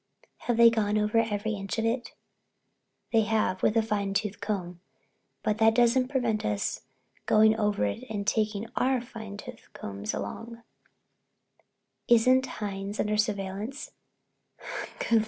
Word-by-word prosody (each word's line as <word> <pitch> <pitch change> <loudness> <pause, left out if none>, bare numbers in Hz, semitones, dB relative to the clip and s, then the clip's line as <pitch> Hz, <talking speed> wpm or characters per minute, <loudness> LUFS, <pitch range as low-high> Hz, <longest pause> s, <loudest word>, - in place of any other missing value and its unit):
"Haven't 235 -1 +3
they 230 - +9
gone 215 -2 +1
over 210 +2 +2
every 220 -1 -1
inch 195 0 -4
of 225 - 0
it?" 235 +2 -1 1.0
"They 225 - +6
have—with 210 -1 +1
a 225 - +4
fine 200 -2 -1
tooth 210 -1 -1
comb. 180 -4 -3 0.6
But 215 +1 0
that 225 0 +5
doesn't 245 +1 +4
prevent 240 -6 0
us 105 -1 -1 0.5
going 215 0 +5
over 210 - +1
it 100 -1 -3
and 205 -2 -3
taking 215 0 0
our 260 0 +2
fine 220 -4 -8
tooth 250 +3 -11
combs 100 +1 -5
along." 230 - -6 1.4
"Isn't 255 +3 +5
Hines 200 -2 -5
under 210 0 +1
surveillance?" 210 +5 -2
215 Hz, 130 wpm, -28 LUFS, 200-230 Hz, 1.4 s, they